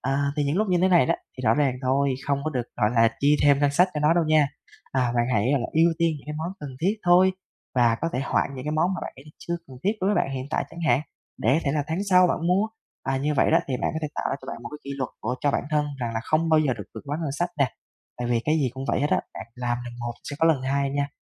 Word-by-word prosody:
Ờ, 140 +2 0
thì 145 - +1
những 145 +3 0
lúc 215 0 +1
như 180 -1 +3
thế 185 - +5
này 175 -8 +5
đó, - - +2 0.2
thì - - -6
rõ 110 0 +4
ràng 140 -3 +2
thôi, 135 +1 +2
không 140 -1 +1
có 155 - -1
được 125 -5 -1
gọi 105 -3 +2
là 115 -1 +5
chi 145 +1 +4
thêm 145 -1 +5
ngân 145 0 +3
sách 180 +6 +4
cho 150 - -1
nó 150 +2 +4
đâu 170 -2 +3
nha, 155 -2 +4 0.4
à, 125 -2 +1
bạn 120 0 +2
hãy 110 +4 +2
là 130 -4 +1
ưu 165 +2 +4
tiên 170 -1 +3
những 140 - -18
cái 150 - -5
món 165 +3 -3
cần 145 -2 -6
thiết 200 +6 +1
thôi, 180 +2 +5 0.4
và 120 -2 +4
có 165 - 0
thể 125 - -1
hoãn - - 0
những 130 - -7
cái 150 - -2
món 175 +5 +1
mà 180 - -5
bạn - - -5
thấy 135 - -14
là 150 - -14
chưa 170 - -3
cần 130 - -12
thiết 200 - +3
đối 190 - +1
với 205 - +2
bạn - - -6
hiện 130 0 -4
tại - - 0
chẳng 170 - -9
hạn, 145 - +4 0.4
để 125 +4 +2
có 160 - +2
thể 140 - +1
là 145 -1 0
tháng 160 +2 -2
sau 180 0 +7
bạn 170 -1 -1
mua. 195 +4 +2 0.3
À, 135 0 -1
như 150 +2 0
vậy - - +3
đó 165 - +5
thì 130 - -1
bạn - - +1
có - - -1
thể 150 - -1
tạo - - -3
ra - - -1
cho - - -11
bạn 135 - -7
một - - -6
cái 150 - -8
kỷ 140 - -6
luật 130 -3 -2
của 125 +4 -2
cho 145 - +2
bản - - -1
thân 150 -1 +1
rằng 115 -1 -2
là 110 - -1
không 160 +1 +1
bao 155 -1 +5
giờ 145 -4 +1
được - - -8
vượt - - -6
quá 145 +1 -2
ngân 145 -4 -2
sách 175 +4 -1
nè. 140 -4 +1 0.4
Tại 120 - -3
vì 120 -1 +2
cái 155 - +2
gì 135 -4 +1
cũng 135 - -5
vậy - - +1
hết 145 - 0
á, - - +3
bạn - - -7
làm 120 -1 -1
lần 120 0 -8
một 120 0 -3
sẽ 145 - -6
có 165 - +5
lần 150 -5 +3
hai 140 +1 0
nha, 140 0 -1
145 Hz, 320 wpm, -25 LUFS, 130-160 Hz, 0.4 s, sau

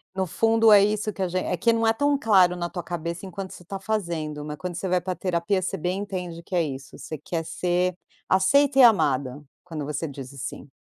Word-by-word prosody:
No 190 -1 -1
fundo 225 +3 +3
é 200 -1 +8
isso 210 +1 0
que 195 - -8
agen 185 0 -2
é 180 - 0
que 230 +6 +3
não 225 0 +1
é - - +5
tão 285 +2 +1
claro 190 -7 +4
na 175 -1 -3
tua 175 0 -5
cabeça 170 +1 -5
enquanto 190 0 -7
você 180 - -12
está 195 +3 -6
fazendo, 170 -8 -3
mas 150 0 -6
quando 180 -1 -5
você 190 - -3
vai 180 -1 +1
para 185 +1 -3
a - - -11
terapia 185 +1 0
você 195 +1 -2
bem 180 +4 -2
entende 180 -4 -5
que 185 - -12
é 175 - +3
isso, 140 -3 -5
você 155 - -7
quer 165 +3 -4
ser 180 +2 0 0.3
aceita 275 +9 +4
e 260 - +8
amada, 140 - +3 0.2
quando 160 -4 -6
você 150 +2 -3
diz 135 -2 -8
o 140 - -13
"sim". 140 +1 -7
180 Hz, 240 wpm, -25 LUFS, 165-200 Hz, 0.3 s, é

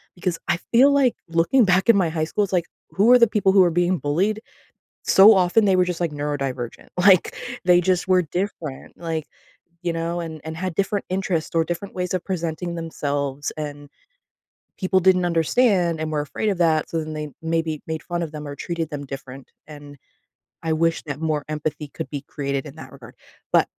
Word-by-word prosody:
because 175 -1 -2
I 170 - +2 0.2
feel 265 +4 +6
like, 275 -4 +3
looking 170 +9 +3
back 185 +2 +2
in 230 - +8
my 175 -4 +2
high 160 -1 -2
school, 205 +6 0
it's 195 - -4
like, 175 -2 +2 0.3
who 210 +5 +4
are 250 - +8
the 235 - +6
people 205 -3 +2
who 190 -2 +7
are 175 - +3
being 175 +2 +1
bullied? 190 +9 0 0.6
So 205 +3 +8
often, 190 +4 +3
they 195 -2 +3
were 180 - +4
just, 180 -1 -4
like, 170 -3 -1
neurodivergent. 135 -4 -4
Like, 185 -1 +5 0.3
they 180 -1 +5
just 180 0 +1
were 185 -1 +4
different, 170 -4 -5
like, 160 -2 -3 0.6
you 170 -1 -1
know, 165 +1 -2
and 160 -2 -6
and 160 0 -6
had 180 -1 -3
different 200 0 -1
interests 185 -4 -2
or 165 -1 +3
different 175 +4 -5
ways 180 0 -2
of 180 - -2
presenting 170 -1 -3
themselves, 145 -3 -3
and 145 -1 -6 0.9
people 190 -1 +2
didn't 185 0 +4
understand 175 0 +2
and 155 0 -3
were 150 - 0
afraid 210 +8 -2
of 190 - -2
that, 160 -3 +2
so 165 - -1
then 155 0 -6
they 150 0 -4
maybe 160 -2 -1
made 160 -1 -4
fun 175 -1 -3
of 160 -2 -5
them 150 -1 -7
or 145 - -6
treated 170 -1 -4
them 145 -1 -6
different, 135 -1 -9 0.2
and 145 -1 -11 0.7
I 160 - -1
wish 165 +1 +1
that 145 -1 -5
more 155 -2 -1
empathy 150 -1 -4
could 130 - -6
be 145 - -4
created 140 0 -3
in 145 +1 -10
that - - -11
regard. 125 -3 -13 0.4
But - - +5
165 Hz, 200 wpm, -22 LUFS, 150-185 Hz, 0.9 s, in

